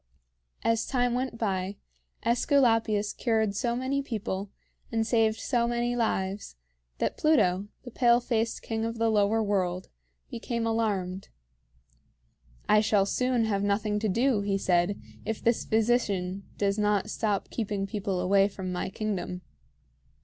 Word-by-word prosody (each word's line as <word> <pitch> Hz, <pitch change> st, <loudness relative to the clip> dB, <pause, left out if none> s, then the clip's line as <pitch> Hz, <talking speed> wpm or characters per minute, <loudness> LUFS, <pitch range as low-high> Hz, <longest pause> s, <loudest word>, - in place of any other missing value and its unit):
As 230 Hz, -1 st, +1 dB
time 245 Hz, -2 st, +1 dB
went 250 Hz, -1 st, -2 dB
by, 195 Hz, -3 st, -2 dB, 0.5 s
AEsculapius 225 Hz, -4 st, +2 dB
cured 220 Hz, -4 st, +1 dB
so 235 Hz, +2 st, 0 dB
many 260 Hz, +3 st, -1 dB
people 205 Hz, -6 st, -4 dB, 0.4 s
and 225 Hz, -1 st, +1 dB
saved 225 Hz, -1 st, +2 dB
so 240 Hz, -3 st, +1 dB
many 240 Hz, 0 st, 0 dB
lives 200 Hz, -, -1 dB, 0.4 s
that -, -, -1 dB
Pluto, 200 Hz, -, +3 dB, 0.2 s
the 245 Hz, -, -9 dB
pale 240 Hz, 0 st, +4 dB
faced 230 Hz, -2 st, -1 dB
king 225 Hz, -1 st, -2 dB
of 230 Hz, 0 st, -3 dB
the 225 Hz, 0 st, +2 dB
Lower 215 Hz, +1 st, +2 dB
World, 185 Hz, -3 st, -1 dB, 0.4 s
became 235 Hz, 0 st, -3 dB
alarmed. 200 Hz, -5 st, -1 dB, 1.4 s
"I 210 Hz, 0 st, +5 dB
shall 210 Hz, -2 st, +3 dB
soon 250 Hz, +2 st, +1 dB
have 200 Hz, -2 st, 0 dB
nothing 210 Hz, +1 st, 0 dB
to 215 Hz, 0 st, 0 dB
do," 235 Hz, +2 st, +2 dB
he 200 Hz, -1 st, 0 dB
said, 180 Hz, +1 st, +1 dB, 0.2 s
"if 220 Hz, -, -3 dB
this 235 Hz, 0 st, +2 dB
physician 205 Hz, -5 st, 0 dB
does 200 Hz, +1 st, 0 dB
not 210 Hz, 0 st, +1 dB
stop 205 Hz, -3 st, -1 dB
keeping 205 Hz, -3 st, -2 dB
people 195 Hz, -2 st, -2 dB
away 195 Hz, +2 st, +4 dB
from 190 Hz, -2 st, -6 dB
my 180 Hz, +1 st, -2 dB
kingdom." 190 Hz, -3 st, -4 dB
215 Hz, 140 wpm, -28 LUFS, 195-235 Hz, 1.4 s, I